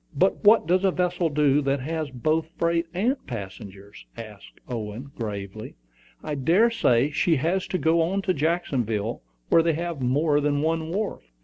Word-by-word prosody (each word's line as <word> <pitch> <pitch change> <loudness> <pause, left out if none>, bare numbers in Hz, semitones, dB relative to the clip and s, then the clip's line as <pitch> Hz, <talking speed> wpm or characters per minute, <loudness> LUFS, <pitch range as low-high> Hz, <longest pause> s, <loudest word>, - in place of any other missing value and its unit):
"But 185 +7 +1
what 215 -2 +6
does 180 +3 +2
a 195 - +4
vessel 180 -2 0
do 145 -1 +2
that 140 0 0
has 155 +2 -3
both 155 +5 -1
freight 170 0 +1
and 230 - -1
passengers?" 100 -3 -9
asked 110 -3 -11
Owen, 115 +3 -6
gravely. 105 -1 -6 0.5
"I 155 - -4
dare 170 - +3
say 130 - +2
she 165 +3 +2
has 170 +7 0
to 185 - -1
go 165 +4 +1
to 190 -1 0
Jacksonville, 130 - -1 0.3
where 165 - +6
they 165 0 +1
have 170 -2 -4
more 145 +4 +2
than 145 0 0
one 160 0 -1
wharf." 200 +4 -3
155 Hz, 165 wpm, -25 LUFS, 125-170 Hz, 0.5 s, what